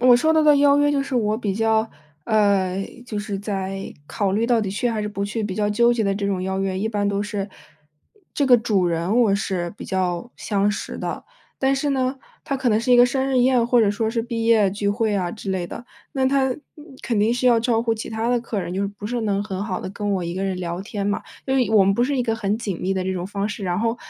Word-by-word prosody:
我 250 0 +7
收 315 +6 +2
到 315 - +4
的 300 -1 +6
邀 280 0 +5
约 290 0 +3
就 275 -1 +1
是 275 - -5
我 215 -3 +1
比 205 -5 -2
较 220 +1 +1 0.3
呃， 195 -3 +2 0.2
就 210 -3 -4
是 205 -1 -4
在 195 -1 -4
考 200 -2 -1
虑 220 +4 +1
到 240 -2 +3
底 200 -3 -2
去 210 +5 -1
还 220 - -2
是 210 - -2
不 200 -1 -3
去 215 +2 -3
比 205 -3 -3
较 210 +1 0
纠 235 +3 +4
结 230 -2 0
的 195 0 +1
这 200 0 -2
种 190 -2 -1
邀 190 +1 -2
约， 190 -1 -1
一 215 - -1
般 205 -2 0
都 200 0 0
是， 205 -1 -4 0.9
这 285 - +1
个 255 -2 +7
主 205 -6 +1
人 170 +7 0
我 205 -4 +3
是 185 -3 -2
比 - - -8
较 185 +4 -2
相 205 -1 0
识 200 - -5
的。 - - -4 0.3
但 270 0 +2
是 280 +2 -1
呢， 265 0 0 0.3
它 280 - -2
可 265 -2 0
能 215 - +3
是 235 +3 +1
一 245 - +7
个 245 - +8
生 265 +2 -1
日 265 -1 +1
宴， 250 -1 +3
或 240 0 +4
者 205 -2 +3
说 220 +2 -1
是 230 0 -1
毕 230 -1 -3
业 220 -4 +4
聚 200 +1 -1
会 220 0 0
啊 180 -3 -1
之 205 -1 -6
类 185 -2 -1
的。 240 - -9 0.3
那 265 -1 +1
他 265 -1 +2 0.5
肯 230 -4 -1
定 215 +3 +3
是 245 +1 0
要 235 -2 +5
照 230 -1 +1
顾 230 -1 0
其 225 - -6
他 225 +1 -2
的 245 0 +2
客 230 -3 -3
人， 180 0 -5
就 195 - -1
是 200 - 0
不 205 +1 -8
是 240 +1 -2
能 200 -2 0
很 200 -1 -4
好 185 -4 -3
地 - - -5
跟 205 +1 -3
我 185 - -1
一 170 0 -4
个 190 - -3
人 190 -1 -1
聊 175 +1 -4
天 200 -1 -4
嘛。 205 - -1 0.2
因 265 0 +1
为 250 -4 +2
我 215 -2 +6
们 195 +1 +3
不 240 - +2
是 275 0 -1
一 - - +2
个 225 -2 -1
很 210 0 -1
紧 200 -7 -4
密 190 - 0
的 190 -1 -1
这 190 - -1
种 180 0 -3
方 200 +1 -2
式， 210 -2 -5
然 180 +2 -1
后， 230 +1 0
215 Hz, 295 characters per minute, -22 LUFS, 195-240 Hz, 0.9 s, 个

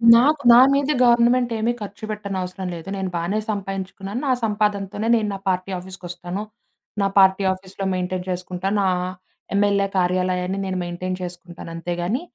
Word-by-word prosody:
నాకు 285 +5 +4
నా 235 - +9
మీద 280 +1 +2
గవర్నమెంట్ 240 0 +4
ఏమీ 225 +2 +1
ఖర్చుపెట్టనవసరం 200 -3 -5
లేదు. 165 +2 -9
నేను 190 -1 -2
బానే 175 +5 0
సంపాయించుకున్నాను. 195 +1 -4
నా - - +3
సంపాదనతోనే 210 -1 0
నేను 220 -2 +1
నా 195 - -5
పార్టీ 185 +1 -1
ఆఫీస్‌కొస్తాను. 180 0 -7 0.6
నా 200 - +3
పార్టీ 190 0 +5
ఆఫీస్‌లొ 190 +1 -7
మెయింటైన్ 180 0 -2
చేసుకుంటా. 180 +1 -3
నా 195 - +2 0.7
ఎమ్మెల్యే 200 -1 +3
కార్యాలయాన్ని 180 +1 0
నేను 190 -1 -2
మెయింటైన్ 180 +1 -4
చేసుకుంటాను. 175 -1 -8
అంతేగాని. 175 - -2
190 Hz, 135 wpm, -22 LUFS, 180-210 Hz, 0.7 s, నా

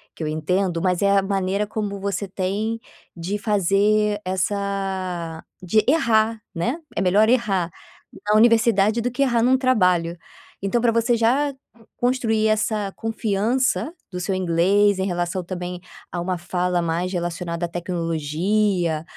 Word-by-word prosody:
que - - -6
eu - - -2
entendo, 170 +3 -1
mas 180 -2 +1
é 200 - +3
a - - +4
maneira 195 +1 0
como 205 -2 -4
você 200 0 -3
tem 200 +4 -2 0.4
de 185 +5 -3
fazer 205 +1 +2
essa 190 -3 -2 0.2
de 215 +4 +3
errar, 225 -6 +3 0.2
né. 240 - -1 0.2
É - - 0
melhor 200 +4 +4
errar 200 -8 +1 0.6
na 210 - +4
universidade 225 -1 +4
do 245 +2 -1
que 275 +3 +1
errar 240 -4 +2
num 260 +2 +4
trabalho. 180 -10 +2 0.4
Então 195 +5 0
pra 235 - +3
você 230 +1 +2
já 265 +6 +2 0.4
construir 235 -3 +1
essa 215 -2 0
confiança 225 - 0 0.2
do 180 - -4
seu 190 +2 -1
inglês, 190 +3 +2
em 190 - 0
relação 175 0 -2
também 180 0 -5 0.3
a 175 - -3
uma 180 0 -2
fala 180 0 -1
mais 170 +2 -1
relacionada 175 -1 -3
à - - -6
tecnologia, 170 +1 -1
195 Hz, 145 wpm, -22 LUFS, 180-220 Hz, 0.6 s, a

